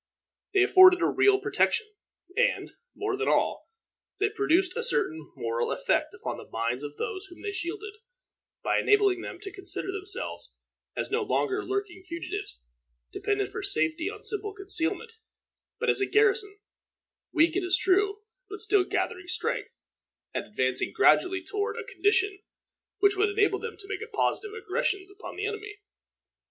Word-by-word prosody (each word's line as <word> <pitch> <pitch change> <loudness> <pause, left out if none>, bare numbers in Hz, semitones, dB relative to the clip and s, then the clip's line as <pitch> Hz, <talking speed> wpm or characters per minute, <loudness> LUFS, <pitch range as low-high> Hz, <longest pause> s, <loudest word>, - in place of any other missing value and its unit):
They 385 - +6
afforded 370 -2 +8
a - - +5
real 395 +1 +4
protection; 435 +1 +1 0.5
and, - - +1 0.2
more 410 0 -1
than 430 +2 -2
all, - - +1 0.5
they 415 +1 +3
produced 370 -3 +2
a - - -1
certain 160 - -1
moral 115 +1 -1
effect - - +1
upon - - -5
the - - -11
minds 115 +4 -2
of 145 0 -7
those 395 -2 -4
whom 350 0 -14
they 410 - -2
shielded, 400 +3 -4 0.7
by - - +2
enabling 405 -3 +4
them - - -6
to 395 -2 -7
consider 385 -1 -3
themselves 395 +5 -5 0.4
as - - -3
no 445 +2 +2
longer 410 -1 0
lurking 395 -2 -3
fugitives, 370 - -6 0.5
dependent 405 -1 -1
for - - -4
safety 345 -3 +1
on 420 0 -9
simple 415 -1 -3
concealment, 395 +3 -3 0.6
but - - -1
as - - +3
a 395 - +2
garrison, 415 -1 +3 0.7
weak, 330 0 +3
it 385 - +1
is 360 +1 +4
true, 400 +2 +2 0.3
but 415 +1 -7
still 415 -2 +4
gathering 365 0 -2
strength, - - -2 0.6
and - - -2
advancing 130 -9 0
gradually 365 0 +4
toward 410 +4 -2
a - - -4
condition 400 -1 +1 0.6
which 405 0 +4
would 410 +2 +3
enable 405 -1 +2
them 465 -1 -6
to 390 - -11
make 395 - -3
positive 425 -1 0
aggressions 400 -3 -2
upon 400 +2 -9
the 415 - -3
enemy. 420 -1 -5
395 Hz, 155 wpm, -28 LUFS, 370-415 Hz, 0.7 s, afforded